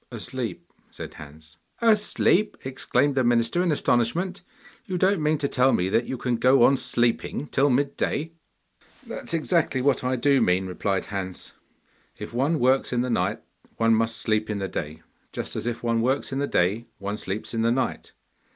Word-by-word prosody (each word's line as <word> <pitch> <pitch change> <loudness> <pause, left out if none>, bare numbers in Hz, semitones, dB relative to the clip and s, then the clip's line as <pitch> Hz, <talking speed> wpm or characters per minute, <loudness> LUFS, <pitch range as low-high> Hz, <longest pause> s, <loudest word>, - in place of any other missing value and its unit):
'Asleep,' 120 -3 -6 0.2
said - - -9
Hans. 80 +2 -13 0.2
'Asleep!' 215 -2 +2
exclaimed 135 +2 0
the 130 -1 +1
minister 120 +7 +2
in 180 -2 +1
astonishment. 160 +9 0 0.5
'You 185 -2 -2
don't 190 -1 +2
mean 150 +1 +2
to 140 - -1
tell 130 -1 +3
me 90 +1 +1
that 115 +4 +1
you 130 - -3
can 120 -1 -1
go 130 +1 +5
on 140 - +6
sleeping 120 +1 -1
till 140 +1 +2
mid 140 +2 0
day?' 160 +3 -2 0.7
'That - - -7
is - - 0
exactly 160 -4 +1
what 135 0 +1
I 130 +1 0
do 135 +2 +3
mean,' 90 +1 +2
replied 95 +1 -2
Hans. 95 -2 -5 0.7
'If - - -8
one 140 +7 +1
works 130 0 +2
in 120 -1 +1
the 125 0 -1
night 95 -3 0 0.4
one 115 0 +3
must 115 0 +1
sleep 110 0 -1
in 105 - -2
the 95 -1 -2
day, 80 -2 -6 0.3
just - - -5
as - - -3
if 120 0 -3
one 115 -1 +1
works 130 +4 0
in 135 - -2
the 140 - 0
day 105 +5 0
one 100 +1 -4
sleeps 105 +1 -5
in 115 - 0
the 115 +1 +2
night. 130 +2 -2
125 Hz, 190 wpm, -25 LUFS, 110-140 Hz, 0.7 s, on